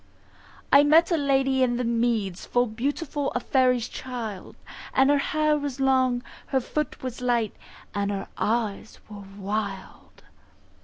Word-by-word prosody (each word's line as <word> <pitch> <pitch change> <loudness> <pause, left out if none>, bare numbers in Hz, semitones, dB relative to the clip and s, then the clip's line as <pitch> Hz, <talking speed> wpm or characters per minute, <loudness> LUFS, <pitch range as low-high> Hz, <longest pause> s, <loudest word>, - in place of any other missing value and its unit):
I 280 - +9
met 320 +4 +5
a - - +4
Lady 270 -3 +2
in 240 -2 +2
the 250 - -1
Meads 230 -5 0
Full 245 0 +2
beautiful, 275 +5 -2
a - - +2
faery's 250 -2 +2
child; 230 -7 -6 0.4
Her 280 +2 +4
hair 305 +1 +1
was 280 -2 -4
long, 260 -2 +2 0.2
her 265 - +1
foot 300 +3 -4
was 250 -1 -5
light, 235 -4 0 0.4
And 200 -1 -1
her 195 -1 -3
eyes 220 -2 -2
were 205 -1 -9
wild. 200 -1 -5
250 Hz, 140 wpm, -25 LUFS, 220-275 Hz, 0.4 s, I